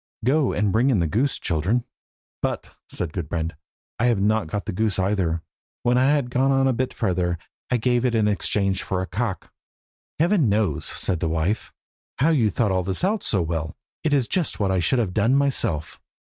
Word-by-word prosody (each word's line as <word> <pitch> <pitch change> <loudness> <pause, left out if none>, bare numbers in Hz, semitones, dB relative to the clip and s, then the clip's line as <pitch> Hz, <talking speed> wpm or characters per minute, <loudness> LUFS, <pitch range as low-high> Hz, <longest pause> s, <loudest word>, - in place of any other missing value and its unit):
Go 140 +1 +3
and 105 -1 +1
bring 120 +6 +3
in 125 - +3
the 85 - +1
goose, 120 - +1
children." 95 +9 0 0.6
"But," - - -3
said 80 -3 -3
Gudbrand, 80 -1 -3 0.5
"I 120 - +2
have 120 -4 +3
not 105 -1 +2
got 100 +5 -3
the - - -3
goose 110 +3 0
either. 95 -4 0 0.4
When 120 0 +3
I 130 +1 +4
had 145 -4 +1
gone 135 +1 +3
a 130 - +3
bit 130 +2 -1
further 90 -5 0 0.3
I 125 - +2
gave 120 +1 +1
it 125 -2 +1
in 110 -2 +3
exchange 100 -2 0
for 95 -1 -2
a - - -2
cock." 100 +1 -4 0.6
"Heaven 165 - +3
knows," 105 0 0
said 90 -4 -2
his 80 - 0
wife, 80 +7 -1 0.5
"how 145 +5 +3
you 120 -9 +3
thought 105 0 +1
all 95 -1 +1
this 95 - -2
out 210 +3 +1
so 95 -5 +1
well! 80 -2 -3 0.3
It 155 - +1
is 135 -5 +2
just 175 +3 -1
what 100 -2 +1
I 95 - +2
should 90 +10 +2
have 105 -7 0
done 115 +6 +3
myself. 130 - 0
105 Hz, 200 wpm, -24 LUFS, 90-125 Hz, 0.6 s, I